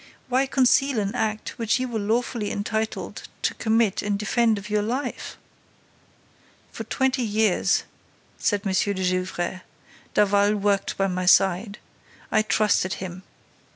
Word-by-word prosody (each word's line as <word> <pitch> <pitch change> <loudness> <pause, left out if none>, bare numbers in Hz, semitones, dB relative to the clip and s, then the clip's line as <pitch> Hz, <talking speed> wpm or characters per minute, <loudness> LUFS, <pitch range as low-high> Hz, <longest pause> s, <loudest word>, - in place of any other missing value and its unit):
Why 260 +2 +2
conceal 270 0 +3
an 200 0 -2
act 220 -2 -3
which 230 +2 +1
you 255 - -1
were 230 -3 -3
lawfully 220 0 -1
entitled 220 +2 -3 0.2
to - - +1
commit 220 -3 +1
in 205 -1 -1
defense 220 +1 +1
of 200 +1 -7
your 210 0 +1
life?" 245 +7 -4 1.3
"For - - -7
twenty 265 -1 0
years," 215 -3 +2 0.6
said 205 -1 0
M. 195 - 0
de 200 +2 +1
Gesvres, 185 0 -1 0.6
"Daval 205 0 +3
worked 200 -1 0
by 195 - +2
my 185 -1 -2
side. 195 +3 +3 0.5
I 215 - +4
trusted 210 -3 +1
him. 185 -1 -7
210 Hz, 135 wpm, -24 LUFS, 195-230 Hz, 1.3 s, I